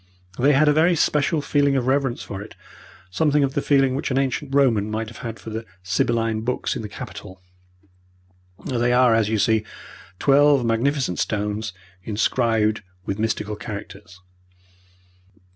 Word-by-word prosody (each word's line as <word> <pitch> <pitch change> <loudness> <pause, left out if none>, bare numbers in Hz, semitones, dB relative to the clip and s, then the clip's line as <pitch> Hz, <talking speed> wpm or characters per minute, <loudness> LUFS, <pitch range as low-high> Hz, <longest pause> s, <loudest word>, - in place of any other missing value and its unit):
They 140 +4 +4
had 150 +3 +4
a 150 - +5
very 165 +3 +3
special 150 0 +1
feeling 145 -1 +2
of 130 -2 0
reverence 135 -2 0
for 100 -1 -7
it 105 - -11 0.6
something 145 - +2
of 135 -1 0
the 140 - 0
feeling 135 -2 +3
which 140 - -2
an 130 - 0
ancient 135 +1 -1
Roman 115 -7 +3
might 110 +1 -4
have 115 -1 -6
for 110 - -9
the 110 +1 -4 0.2
Sibylline 110 +4 0
books 125 +3 -2
in - - -4
the 105 - -7
Capitol. 95 -2 -9 1.3
There 120 0 +1
are, 125 -2 +5
as 110 -2 +2
you 110 - +1
see, 110 +1 +2 0.5
twelve 140 0 +4
magnificent 120 -2 0
stones, 105 0 -2 0.3
inscribed 110 0 +1 0.2
with 100 +1 -3
mystical 110 -1 -2
characters. 100 -4 -9
120 Hz, 150 wpm, -22 LUFS, 110-140 Hz, 1.3 s, a